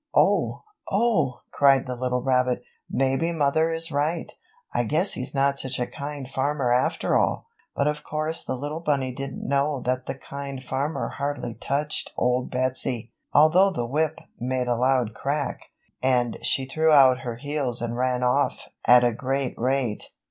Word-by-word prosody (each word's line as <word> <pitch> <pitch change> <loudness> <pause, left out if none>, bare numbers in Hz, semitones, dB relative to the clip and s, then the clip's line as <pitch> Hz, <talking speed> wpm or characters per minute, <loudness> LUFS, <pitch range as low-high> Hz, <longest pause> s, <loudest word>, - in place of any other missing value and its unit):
"Oh, - - +3 0.3
Oh!" 190 - +1
cried 135 -2 +4
the 125 -1 -4
little 125 0 -1
rabbit, 125 -2 +1 0.3
"Maybe 135 +5 +1
mother 160 0 +2
is 165 0 -1
right. 150 +4 -1 0.4
I - - +2
guess 160 - +1
he's 125 - -5
not 140 0 +2
such 130 -1 -4
a 125 - +1
kind 145 -1 -6
farmer 135 -1 0
after 125 - +1
all!" - - +1 0.3
But 140 - +1
of 150 0 -1
course 155 +2 -3
the 130 - -3
little 145 +5 -4
bunny 140 -6 0
didn't 135 +1 -6
know 140 +1 +1
that 130 0 -1
the - - -3
Kind 140 -1 -7
Farmer 140 +5 -2
hardly 140 -4 -2
touched 140 +6 -2
Old 125 +1 +1
Betsy, 125 -2 -2 0.2
although 160 +6 +6
the 140 -11 -2
whip 155 +5 0 0.2
made 125 +1 -1
a 120 - +2
loud 125 -2 +2
crack 140 +4 -2 0.4
and 125 -2 +1
she 135 - 0
threw 160 +4 +2
out 130 -3 +7
her 120 -2 -5
heels 140 -2 -2
and 120 0 -3
ran 125 0 0
off 125 0 +1 0.2
at 125 +1 +8
a 120 -1 +3
great 135 +2 -2
rate. 125 -3 -1
135 Hz, 165 wpm, -25 LUFS, 125-150 Hz, 0.4 s, at